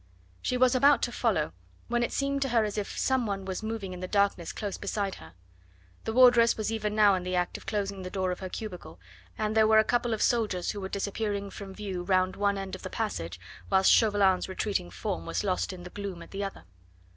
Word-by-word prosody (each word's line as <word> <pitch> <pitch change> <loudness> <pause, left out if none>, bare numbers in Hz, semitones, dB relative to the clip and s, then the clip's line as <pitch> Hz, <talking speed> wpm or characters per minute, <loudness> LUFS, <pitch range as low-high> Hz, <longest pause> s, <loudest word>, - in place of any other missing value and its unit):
She 250 - 0
was 255 0 +4
about 280 +3 +5
to 240 - 0
follow, 210 -11 0 0.3
when 240 0 0
it 240 - 0
seemed 275 0 -1
to 270 - +1
her 230 -2 +3
as 210 -1 -3
if 210 -2 -4
some 260 -3 +1
one 195 -1 -3
was 190 -1 -4
moving 220 -4 -4
in 180 - -7
the 185 - -4
darkness 200 -4 +1
close 205 -3 -4
beside 200 -1 -2
her. 80 +1 -13 0.7
The 225 - -1
wardress 245 -2 +6
was 215 0 -1
even 215 -2 -2
now 210 -2 +6
in 185 - 0
the 180 0 -2
act 180 0 0
of - - -9
closing 200 -2 -2
the 185 - -5
door 185 -1 -1
of 180 - -4
her 185 - -5
cubicle, 180 - -7 0.4
and 215 0 -1
there 220 -1 +5
were 220 0 +5
a 220 - +7
couple 240 0 +1
of 215 - -1
soldiers 210 -7 +1
who 205 - -6
were 190 - -4
disappearing 200 0 -2
from 195 -2 -9
view 195 -4 -4
round 185 0 +1
one 200 0 +1
end 195 -1 -5
of 190 - -6
the 185 - -6
passage, 85 - -3 0.3
whilst 190 -1 +5
Chauvelin's 200 -4 +3
retreating 190 - -2
form 85 -1 -4
was - - -1
lost 190 -1 0
in 180 -1 -9
the 180 - -9
gloom 195 -4 -6
at - - -15
the 200 +1 -3
other. 195 - -6
200 Hz, 235 wpm, -28 LUFS, 185-220 Hz, 0.7 s, a